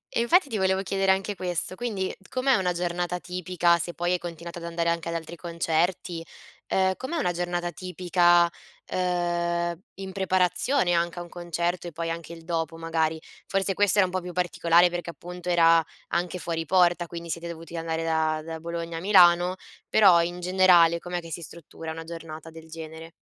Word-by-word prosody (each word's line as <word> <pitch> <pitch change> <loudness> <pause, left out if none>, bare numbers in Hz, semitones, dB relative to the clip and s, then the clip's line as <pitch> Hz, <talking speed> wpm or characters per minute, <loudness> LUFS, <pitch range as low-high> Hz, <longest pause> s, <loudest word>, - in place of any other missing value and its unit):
e - - +2
infatti 340 +8 +4
ti 220 - -2
volevo 190 0 +2
chiedere 195 0 +1
anche 195 +2 0
questo, 180 0 -3
quindi 205 -5 -3 0.2
com'è 260 +1 +2
una 185 -3 +1
giornata 175 0 -2
tipica, 180 -1 +1
se 170 +1 -4
poi 175 +1 -1
hai 180 - 0
continuato 170 0 -7
ad 170 - -8
andare 170 0 -1
anche 170 0 -1
ad 170 - -3
altri 165 +1 -5
concerti? 170 +1 -1 0.5
Uhm, 190 0 +2
com'è 315 +6 -4
una 180 - +1
giornata 175 0 -2
tipica, 175 -1 +3 0.4
uhm, 175 -1 0 0.2
in 195 -1 -7
preparazione 185 +3 +1
anche 170 +1 0
a - - -4
un 175 - -13
concerto 175 0 -3
e - - -6
poi 165 +1 -4
anche 165 0 -6
il 165 -1 -12
dopo, 165 -1 -2
magari? 160 -1 -1 0.3
Forse 195 0 0
questa 205 0 +2
era 190 - +6
un 180 - -9
po' 185 - 0
più 180 0 -7
particolare 175 0 +3
perché 175 -1 -4
appunto 180 +1 -7
era 165 -1 +5 0.3
anche 175 +1 -1
fuori 165 -1 -2
porta, 175 +1 +3
quindi 170 0 -8
siete 170 +2 -4
dovuti 165 0 -8
andare 165 0 -2
da 160 -1 +1
da 160 0 -6
Bologna 170 0 -5
a - - -3
Milano, 180 -2 +5 0.3
però 185 -5 +6
in 175 +1 -3
generale 180 -2 +5
com'è 175 0 -4
che 165 -1 -11
si 170 - -4
struttura 165 +1 -8
una 165 +1 -6
giornata 165 -1 -8
del 160 0 -13
genere? 160 0 -9
175 Hz, 190 wpm, -26 LUFS, 165-180 Hz, 0.5 s, era